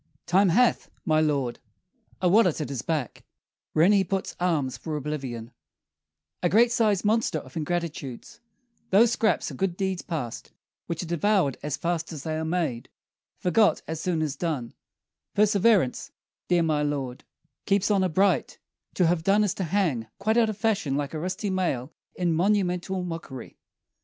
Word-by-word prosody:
Time 190 +2 +4
hath, 240 +7 +3 0.2
my 155 -1 +3
lord, 140 -6 0 0.6
a - - +5
wallet 180 -3 +4
at 150 - -3
his 135 -4 -3
back, 150 -8 -3 0.5
Wherein 165 +6 +5
he 200 -2 +4
puts 190 +1 -3
alms 155 -8 0
for 155 -2 -4
oblivion, 130 -6 -5 0.9
A 175 - +2
great 235 +5 +5
sized 215 -4 +2
monster 225 +2 +2
of - - -10
ingratitudes: 165 - -4 0.5
Those 220 +4 +5
scraps 220 -2 +1
are - - -8
good 190 -2 -2
deeds 190 -2 -1
past; 145 -9 -5 0.3
which 170 +1 -3
are - - -5
devoured 175 -3 +1
As 150 -1 -3
fast 170 -1 -2
as 150 -4 -7
they 160 -1 -2
are 160 - -2
made, 160 -8 -2 0.5
forgot 210 +4 +2
as 160 0 -4
soon 165 -2 0
As 150 -3 -2
done: 140 -7 -3 0.6
perseverance, 205 - +3 0.4
dear 175 -1 +3
my 155 -2 +1
lord, 140 -4 -3 0.4
Keeps 200 +1 +2
honor 190 -2 +2
bright: 185 -2 +1 0.4
to 180 - +3
have 165 0 +2
done, 200 +4 +4
is 205 - +1
to 190 - -3
hang 160 - 0
Quite 215 +3 0
out 230 -2 +4
of 215 - -4
fashion, 200 -12 0
like 145 0 -3
a 155 - -3
rusty 185 +4 -3
mail 165 -7 -1 0.2
In 175 -2 0
monumental 185 0 +1
mockery. 165 -7 -7
175 Hz, 160 wpm, -26 LUFS, 150-195 Hz, 0.9 s, a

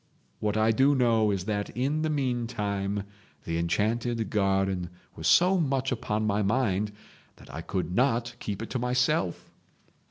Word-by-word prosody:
What 105 0 -1
I 110 +1 +4
do 135 +5 +4
know 115 -4 +3
is 95 -3 -1
that 105 -1 -2
in 140 +5 0
the 155 - 0
meantime 115 -8 -1 0.4
the 85 0 -2
enchanted 110 +6 0
garden 95 -3 +1 0.3
was 80 - -3
so 185 +2 +5
much 135 -4 0
upon 110 -3 -1
my 105 0 +1
mind 105 -2 +1 0.4
that - - -15
I 80 - -5
could 90 -1 -3
not 120 +1 +1
keep 105 +1 -4
it - - -8
to 130 - -1
myself. 125 - 0
110 Hz, 155 wpm, -28 LUFS, 100-125 Hz, 0.4 s, so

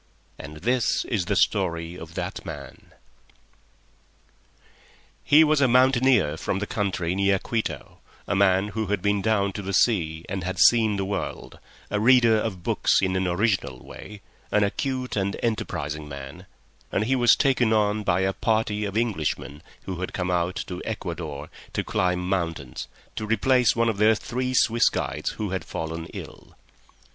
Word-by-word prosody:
And 75 +2 -9
this 125 0 +1
is 100 -7 -1
the 100 +3 0
story 85 -5 +1
of 85 -2 -10
that - - -4
man. - - -10 2.3
He 155 +2 +6
was 155 -2 +3
a 130 - +5
mountaineer 125 - +4
from - - -2
the 105 - -2
country 95 -5 -2
near 100 0 +2
Quito, 95 - -4 0.3
a - - 0
man 95 +1 +3
who 110 0 -3
had 100 -2 -1
been 100 -1 +1
down 100 -2 +1
to 100 - -5
the 100 -1 -3
sea 80 -9 +1
and 95 -1 -4
had 95 +1 -3
seen 110 +6 +5
the 95 - -1
world, 100 +1 -5 0.3
a 105 - 0
reader 115 -1 +5
of 95 -5 -4
books - - +2
in 95 -1 0
an 95 0 0
original 90 - 0
way, 105 0 -11 0.3
an 105 - +3
acute 130 +5 -2
and 100 -1 -1
enterprising 75 -9 -3
man, 70 +6 -9 0.4
and 100 - +1
he 130 +5 +1
was 120 -3 +5
taken 130 -5 +2
on 105 -1 +2
by 95 -2 +1
a 95 0 +1
party 110 -1 0
of 100 +1 -3
Englishmen 80 -9 -2 0.2
who 95 -2 -5
had 90 - -4
come 90 0 -2
out 90 +1 0
to 90 -2 -6
Ecuador 85 -8 -5 0.3
to - - -1
climb 90 0 0
mountains, 80 -9 -3 0.3
to 110 - -4
replace 120 +2 +3
one 115 0 +2
of 110 -3 0
their 110 +1 +5
three 125 +4 -3
Swiss 115 -1 +4
guides - - -3
who 105 -3 -4
had 95 - -2
fallen 80 0 -5
ill. - - -11
100 Hz, 165 wpm, -25 LUFS, 90-110 Hz, 2.3 s, He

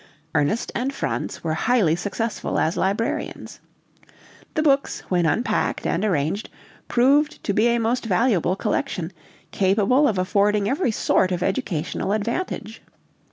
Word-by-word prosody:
Ernest 155 +9 0
and 255 +3 -1
Franz 275 - -4
were 160 -1 -1
highly 190 -3 +2
successful 210 +5 -3
as 160 - +1
librarians. 200 +4 -2 1.0
The 310 - +1
books, 280 -2 +2
when 175 -3 +2
unpacked 230 - 0
and - - 0
arranged, 180 +1 0 0.4
proved 285 +5 +2
to 200 - -1
be 215 +4 +3
a 235 0 +2
most 235 +2 0
valuable 190 -3 +2
collection, 195 - -2 0.4
capable 210 +9 +3
of 210 - 0
affording 200 +2 +2
every 275 - +1
sort 190 -3 +2
of 180 -1 -1
educational 195 - -2
advantage. 225 - -3
210 Hz, 130 wpm, -23 LUFS, 185-245 Hz, 1.0 s, be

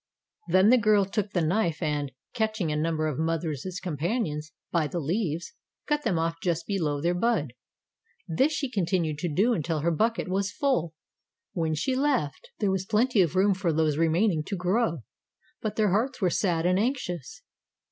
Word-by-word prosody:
Then 190 +3 +5
the 250 +1 +6
girl 210 -2 +4
took 200 +1 -2
the 175 -4 0
knife 170 -1 +1
and, 150 -4 -1 0.2
catching 220 -8 -1
a - - -1
number 155 0 0
of 150 -2 -3
mother's 160 -3 -1 0.2
companions 160 - -2 0.2
by 165 -3 +1
the 175 - -5
leaves, 170 +1 -2 0.3
cut 295 0 0
them 185 - 0
off 165 0 -1
just 170 -2 -1
below 160 -8 -1
their 170 +4 +1
bud. 180 - 0 0.7
This 265 - +2
she 295 -2 -1
continued 170 -7 0
to 175 0 -2
do 210 +11 +3
until 160 -4 -1
her 170 +3 +1
bucket 220 +8 0
was 195 +2 -1
full. 170 - 0 0.6
When 160 -3 0
she 255 - 0
left 265 - 0
there 205 -3 +1
was 190 0 -2
plenty 225 +1 +3
of 175 -1 +1
room 195 +2 +4
for 185 -2 0
those 155 -1 +1
remaining 165 +2 +2
to 200 - -3
grow, 180 - 0 0.6
but 215 -2 -3
their 215 -3 +2
hearts 240 +7 0
were 185 -5 +2
sad 170 -4 +1
and 180 +1 +3
anxious. 205 - -3
180 Hz, 180 wpm, -27 LUFS, 160-215 Hz, 0.7 s, the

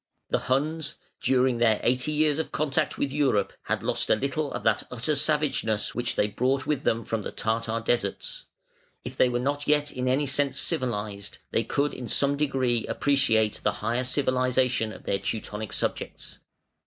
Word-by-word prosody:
The - - +2
Huns, 155 +3 0 0.3
during 130 -2 +2
their 115 -3 +4
eighty 125 +4 +2
years 150 0 +2
of 160 - -3
contact 150 -2 0
with 140 - -1
Europe, 135 -9 +1
had - - -1
lost - - 0
a - - +6
little 140 +4 -2
of - - -5
that 110 -2 +3
utter 125 +5 -1
savageness 140 -8 +1
which 120 -1 -2
they 105 - +2
brought 130 +6 0
with 150 -3 0
them 115 -3 0
from 115 0 -2
the - - -5
Tartar 115 0 -1
deserts. - - -1 0.6
If - - -6
they 125 - +4
were 120 - 0
not 145 +4 -1
yet 150 0 +3
in 130 -1 -3
any 135 +3 +2
sense 140 0 0
civilised, 105 - -2
they 115 - +1
could 140 +5 0
in 125 - -6
some 140 +5 +2
degree 130 -5 0
appreciate 110 -7 +2
the - - +1
higher 120 +2 +1
civilisation 130 -3 +1
of - - -11
their 100 - 0
Teutonic 105 +1 -4
subjects. - - -3
130 Hz, 175 wpm, -27 LUFS, 115-145 Hz, 0.6 s, a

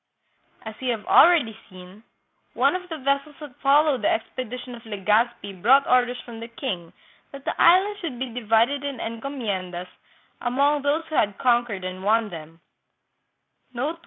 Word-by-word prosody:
As 220 - -7
we 260 - -3
have 225 -3 -2
already 315 -11 +5
seen, 185 +3 -14 0.5
one - - +3
of 365 0 -6
the 320 - -5
vessels 275 +1 -1
that 295 -5 -10
followed 285 0 +3
the 315 - +3
expedition 255 -7 -4
of 235 - -12
Legazpi 210 -2 -1
brought 270 +6 +5
orders 250 0 +2
from 235 -2 -9
the 230 - -7
king 190 -8 -5 0.4
that 275 0 -11
the - - -1
Islands 390 +4 +5
should 325 -10 -5
be 250 -1 -5
divided 240 +4 +1
in 280 -2 -4
encomiendas 215 -7 -4 0.5
among 280 +4 +1
those 290 +4 0
who 310 - -4
had 205 -6 +1
conquered 240 -6 +1
and 185 +1 -6
won 220 +1 +2
them. 165 -1 -11
245 Hz, 155 wpm, -24 LUFS, 210-280 Hz, 0.5 s, already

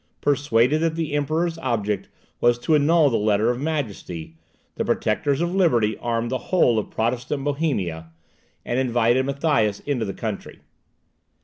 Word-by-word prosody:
Persuaded 145 -1 +2
that 165 -1 0
the 160 -3 -3
Emperor's 160 +3 0
object 105 -8 -2 0.3
was 120 0 +3
to 125 +6 0
annul 150 0 +4
the 115 - +2
Letter 105 +2 +2
of 125 - -4
Majesty, 105 - -4 0.4
the - - -2
Protectors 140 +1 0
of 175 +1 -1
Liberty 120 - +2
armed 115 0 -2
the 130 - -1
whole 125 -11 +3
of 105 - -5
Protestant 125 +5 -2
Bohemia, 130 - -2 0.6
and 120 - -1
invited 125 0 +2
Matthias 140 -8 +1
into 140 -5 -2
the 100 - -5
country. 110 -3 -6
125 Hz, 145 wpm, -23 LUFS, 110-150 Hz, 0.6 s, annul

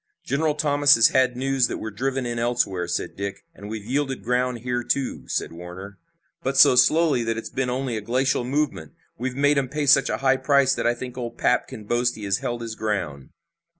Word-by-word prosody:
"General 150 +3 0
Thomas 145 -1 +4
has 115 - +6
had 130 -1 +2
news 135 -1 +1
that - - -4
we're 110 - -6
driven 130 +4 -2
in 120 -1 -3
elsewhere," 110 -7 0
said 85 - -3
Dick. 100 0 -6
"And 100 +1 -10
we've 110 -2 -6
yielded 135 +2 -2
ground 125 0 -1
here, 120 0 -2
too," 135 +1 -2
said - - -2
Warner. 90 +3 -10 0.4
"But 135 +1 -2
so 130 - +7
slowly 145 0 +4
that 115 0 -2
it's 115 - -6
been 130 -1 -2
only 125 -2 -2
a - - -4
glacial 125 +3 0
movement. 130 - -2 0.3
We've 125 +1 -3
made 145 +1 +3
'em 130 -2 -3
pay 150 +1 -2
such 135 0 +5
a - - -1
high 135 -1 +2
price 135 0 +3
that - - -1
I 120 - +2
think 125 +1 -7
old 120 -1 -6
'Pap' - - +1
can 110 - -9
boast 120 +3 0
he 110 - -9
has 100 -1 0
held 120 -1 -4
his 115 -1 -5
ground." 100 -11 -3
125 Hz, 215 wpm, -23 LUFS, 110-135 Hz, 0.4 s, so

